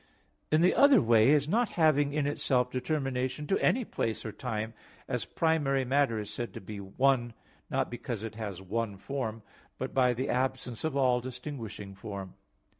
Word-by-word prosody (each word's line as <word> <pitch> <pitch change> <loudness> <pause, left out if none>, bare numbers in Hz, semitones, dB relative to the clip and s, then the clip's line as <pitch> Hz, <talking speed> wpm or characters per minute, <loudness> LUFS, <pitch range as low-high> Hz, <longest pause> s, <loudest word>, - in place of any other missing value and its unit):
In 155 +1 +4
the 180 - +5
other 280 0 +7
way 115 +2 +5
as 145 -1 +1
not 225 +6 +2
having 145 -3 +4
in 145 0 0
itself 125 -3 +1
determination 130 +1 -2
to 195 - 0
any 250 -1 +3
place 115 - -2
or 110 - -3
time, 110 -1 -4 0.3
as - - -2
primary 145 -5 +1
matter 135 -3 +2
is 105 0 -5
said 120 +1 -5
to - - -5
be 100 +2 -8
one, 120 +4 +1 0.4
not - - -1
because 120 -2 -4
it 110 - -5
has 100 -4 -6
one 105 +1 -2
form, 115 -1 -4 0.3
but 130 - -4
by 125 -2 +3
the 130 +3 -2
absence 130 -2 -1
of 155 -3 -1
all 125 -2 +3
distinguishing 125 -6 -7
form. 95 -1 -7
125 Hz, 175 wpm, -30 LUFS, 110-140 Hz, 0.4 s, other